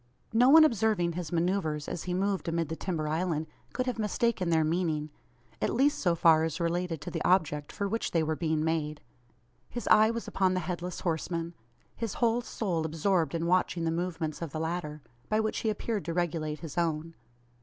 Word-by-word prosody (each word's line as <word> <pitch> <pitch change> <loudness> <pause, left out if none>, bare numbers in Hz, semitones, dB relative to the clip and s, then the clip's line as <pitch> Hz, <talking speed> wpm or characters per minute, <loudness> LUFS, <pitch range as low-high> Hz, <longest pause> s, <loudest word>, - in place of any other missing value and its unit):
No 245 +3 +5
one 315 +2 +9
observing 215 - +2
his 170 -2 -5
manoeuvres 165 -3 0
as 170 - -4
he 180 -1 -1
moved 195 0 0
amid 165 -2 -1
the 160 - -3
timber 160 -3 -3
island, 160 0 -1 0.3
could 255 - -2
have 250 -3 -2
mistaken 210 -3 0
their 160 -1 +3
meaning 155 -2 -1 0.5
at - - 0
least 280 +4 +3
so 175 -3 +2
far 160 -1 +5
as 160 +1 -2
related 170 -1 -1
to - - -6
the - - -3
object 150 -5 +2
for 200 - -2
which 225 +3 -1
they 165 -2 +1
were 155 0 0
being 155 -1 0
made. 155 -2 -1 0.7
His 240 - -5
eye 215 +1 +7
was 230 0 -3
upon 185 -1 +1
the - - +1
Headless 175 +1 -4
Horseman, 170 0 -2 0.4
his 225 -3 -4
whole 235 0 +2
soul 185 -9 -2
absorbed 165 0 0
in 165 0 -1
watching 180 -1 +1
the 165 - +1
movements 165 -2 -3
of 165 -4 -4
the 155 - -4
latter 160 -3 -3 0.3
by 215 - +2
which 220 0 0
he 220 - 0
appeared 215 -1 -2
to 165 0 -3
regulate 155 -3 -1
his 165 0 -4
own. 165 -1 -1
170 Hz, 195 wpm, -29 LUFS, 160-195 Hz, 0.7 s, one